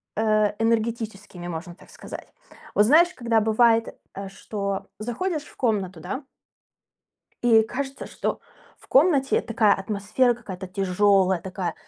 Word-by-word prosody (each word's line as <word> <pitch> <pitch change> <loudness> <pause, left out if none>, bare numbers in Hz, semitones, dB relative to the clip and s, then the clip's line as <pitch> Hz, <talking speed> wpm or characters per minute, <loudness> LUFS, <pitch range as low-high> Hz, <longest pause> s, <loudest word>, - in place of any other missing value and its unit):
э, 215 -1 +2
энергетическими, 220 -5 -2
можно 175 +1 -6
так - - -19
сказать. - - -10 0.4
Вот 210 - +5
знаешь, 335 +8 +5
когда 235 -6 +1
бывает, 225 +1 +3 0.2
э, 195 0 -5
что 200 0 -4
заходишь 290 - -2
в - - -17
комнату, 200 -8 -1
да 265 - -5 1.2
и 230 -2 +6
кажется, 270 +4 -5
что - - -3 0.4
в - - -21
комнате 275 -2 +4
такая 225 -3 +2
атмосфера, 210 +5 0
какая-то 195 -5 -8
тяжёлая, 190 0 +2
такая, 185 -1 -4
215 Hz, 125 wpm, -24 LUFS, 195-240 Hz, 1.2 s, и